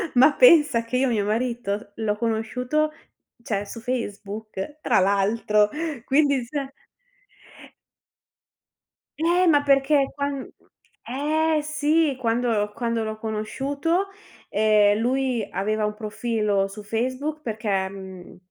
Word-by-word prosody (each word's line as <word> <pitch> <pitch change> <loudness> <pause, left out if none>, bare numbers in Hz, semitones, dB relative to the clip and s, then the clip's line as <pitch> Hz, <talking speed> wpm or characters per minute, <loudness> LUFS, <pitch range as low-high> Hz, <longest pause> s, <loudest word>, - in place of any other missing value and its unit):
Ma 260 +5 +7
pensa 295 - +6
che 230 +2 -2
io 265 +1 +2
mio 210 -4 0
marito 215 -2 -2
l'ho 215 -2 -1
conosciuto 245 +7 -1 0.5
cioè, 205 -3 -2
su 230 - -8
Facebook 215 +1 -5
tra - - +3
l'altro, 205 +2 +2 0.4
quindi 280 -3 +2
cioè 275 +1 -4 2.5
Eh, 350 +3 +3
ma 290 -3 +4
perché 275 0 +3
quan 280 -1 -3 0.6
eh, 310 +4 +1
sì, 300 -1 +1
quando 230 -3 0
quando 230 -1 -1
l'ho 220 0 -4
conosciuto, 280 - -2 0.4
ehm, 210 0 +3
lui 250 -3 0
aveva 215 +2 -1
un 210 - -2
profilo 210 -2 -1
su 205 +2 -10
Facebook 255 +8 -2
perché, 210 -6 -1
mhmm, 190 -2 -10
235 Hz, 110 wpm, -24 LUFS, 210-280 Hz, 2.5 s, Ma